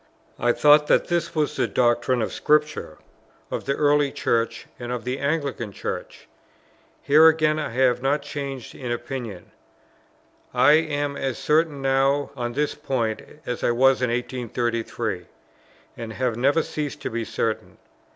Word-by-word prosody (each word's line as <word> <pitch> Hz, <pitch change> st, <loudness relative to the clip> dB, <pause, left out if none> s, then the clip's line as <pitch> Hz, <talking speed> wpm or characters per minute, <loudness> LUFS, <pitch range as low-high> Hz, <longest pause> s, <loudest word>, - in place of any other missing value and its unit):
I 120 Hz, -, +3 dB
thought 150 Hz, +3 st, +5 dB
that -, -, +3 dB
this 170 Hz, -1 st, -1 dB
was 150 Hz, -2 st, 0 dB
the -, -, +1 dB
doctrine 120 Hz, 0 st, +2 dB
of -, -, -4 dB
Scripture, 150 Hz, -, +1 dB, 0.5 s
of -, -, -3 dB
the 140 Hz, -, 0 dB
early 145 Hz, -1 st, +3 dB
Church, 115 Hz, 0 st, -1 dB
and 120 Hz, 0 st, -5 dB
of 125 Hz, -2 st, -3 dB
the 125 Hz, +2 st, -3 dB
Anglican 140 Hz, -6 st, -2 dB
Church. -, -, -6 dB, 0.8 s
Here 155 Hz, +3 st, +7 dB
again, 155 Hz, -1 st, +3 dB
I 150 Hz, -, -2 dB
have 125 Hz, 0 st, +2 dB
not 140 Hz, +2 st, +1 dB
changed 140 Hz, -4 st, -6 dB
in 125 Hz, -3 st, -5 dB
opinion; 120 Hz, -5 st, -5 dB, 1.0 s
I 145 Hz, -, +6 dB
am 145 Hz, -2 st, +1 dB
as 135 Hz, -3 st, -2 dB
certain 150 Hz, -2 st, +1 dB
now 135 Hz, +1 st, +2 dB
on 120 Hz, -2 st, -3 dB
this 145 Hz, +2 st, 0 dB
point 115 Hz, -5 st, -2 dB, 0.2 s
as 125 Hz, -, -4 dB
I -, -, +3 dB
was 130 Hz, +2 st, +4 dB
in 125 Hz, -, +1 dB
1833, 120 Hz, -5 st, -2 dB, 0.7 s
and 115 Hz, -1 st, -7 dB
have 125 Hz, -2 st, -1 dB
never 140 Hz, +7 st, +2 dB
ceased 145 Hz, -5 st, -4 dB
to -, -, -3 dB
be 115 Hz, 0 st, -2 dB
certain. 110 Hz, 0 st, -3 dB
135 Hz, 150 wpm, -24 LUFS, 120-145 Hz, 1.0 s, Here